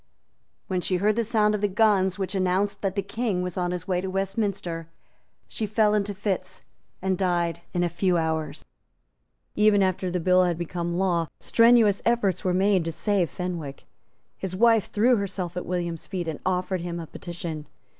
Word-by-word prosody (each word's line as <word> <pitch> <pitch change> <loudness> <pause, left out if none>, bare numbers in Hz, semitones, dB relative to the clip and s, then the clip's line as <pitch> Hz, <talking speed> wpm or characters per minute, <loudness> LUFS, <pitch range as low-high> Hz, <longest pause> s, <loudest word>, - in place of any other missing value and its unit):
When 185 -1 -1
she 185 - 0
heard 205 +4 +2
the 235 - +1
sound 215 -1 +2
of 210 - -1
the 205 - +3
guns 195 -2 +2
which 190 -1 -3
announced 190 +1 0
that 195 -1 -1
the 200 - 0
King 200 -2 -2
was 180 -1 -4
on 180 -1 -1
his 180 0 -4
way 180 -2 0
to 190 - -4
Westminster, 195 -4 -2 0.6
she 220 - -3
fell 210 0 +3
into 205 -1 0
fits, 185 -2 -2 0.4
and 190 0 +1
died 175 -2 0
in 175 -1 0
a - - +2
few 175 +1 +1
hours. 160 -2 -2 0.9
Even 210 -1 +4
after 185 0 0
the 180 0 -1
bill 185 +2 +4
had 175 -2 0
become 175 0 -3
law, 175 -3 +1
strenuous 230 -3 +4
efforts 210 -6 +1
were 185 - +1
made 190 0 +3
to 165 - -1
save 195 0 0
Fenwick. 170 -7 -5 0.5
His 185 -1 -4
wife 225 0 +4
threw 235 +4 +3
herself 185 -3 -3
at 180 - -4
William's 175 -2 -3
feet, 180 -4 -4
and 160 -2 -4
offered 185 0 0
him 170 0 -4
a 165 - -5
petition. 165 -3 -7
185 Hz, 185 wpm, -25 LUFS, 175-205 Hz, 0.9 s, Even